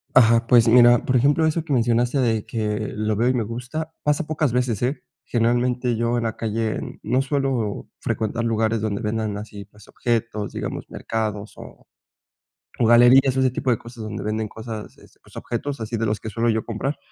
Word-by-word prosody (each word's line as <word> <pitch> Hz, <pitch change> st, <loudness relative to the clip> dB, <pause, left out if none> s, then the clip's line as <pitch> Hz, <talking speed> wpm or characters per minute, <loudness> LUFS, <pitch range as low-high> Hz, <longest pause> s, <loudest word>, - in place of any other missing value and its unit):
Ajá. 115 Hz, -2 st, +6 dB
Pues 120 Hz, -2 st, +5 dB
mira, 120 Hz, 0 st, +7 dB
por 130 Hz, -, +1 dB
ejemplo, 145 Hz, +6 st, +3 dB
eso 160 Hz, +1 st, 0 dB
que 155 Hz, -3 st, -3 dB
mencionaste 120 Hz, +2 st, +2 dB
de 115 Hz, -4 st, +1 dB
que 105 Hz, -1 st, -3 dB
lo 110 Hz, 0 st, -1 dB
veo 120 Hz, +4 st, +2 dB
y 130 Hz, -, +2 dB
me 120 Hz, -3 st, 0 dB
gusta, 125 Hz, +8 st, -5 dB
pasa 150 Hz, +2 st, 0 dB
pocas 150 Hz, -5 st, 0 dB
veces, 125 Hz, -4 st, 0 dB
¿eh? 135 Hz, +4 st, -1 dB, 0.2 s
Generalmente, 120 Hz, +1 st, +1 dB
yo 115 Hz, +1 st, 0 dB
en 120 Hz, -, -1 dB
la 110 Hz, -1 st, -2 dB
calle 110 Hz, 0 st, -3 dB
no 125 Hz, +4 st, +1 dB
suelo 135 Hz, -7 st, -2 dB
frecuentar 115 Hz, +2 st, -2 dB
lugares 115 Hz, -1 st, 0 dB
donde 105 Hz, -1 st, -2 dB
vendan 110 Hz, -1 st, -2 dB
así, 105 Hz, -2 st, -8 dB
pues, 105 Hz, +1 st, -19 dB
objetos, 115 Hz, -3 st, -2 dB
digamos -, -, -5 dB
mercados 105 Hz, -2 st, -4 dB
o -, -, -13 dB, 0.9 s
o 120 Hz, -, +2 dB
galerías 120 Hz, +3 st, +6 dB
o 130 Hz, -, +1 dB
ese 130 Hz, -, +3 dB
tipo 130 Hz, +1 st, -2 dB
de 115 Hz, -, +2 dB
cosas 120 Hz, -1 st, -10 dB
donde 110 Hz, 0 st, -5 dB
venden 110 Hz, +1 st, -2 dB
cosas, 110 Hz, 0 st, -8 dB
este, -, -, -20 dB
pues, -, -, -20 dB
objetos 135 Hz, +3 st, -4 dB
así 115 Hz, +1 st, -3 dB
de 115 Hz, -, -1 dB
los 105 Hz, -2 st, -1 dB
que 110 Hz, -, -6 dB
suelo 115 Hz, +2 st, 0 dB
yo 110 Hz, 0 st, 0 dB
comprar, 120 Hz, +6 st, -3 dB
115 Hz, 195 wpm, -22 LUFS, 110-125 Hz, 0.9 s, mira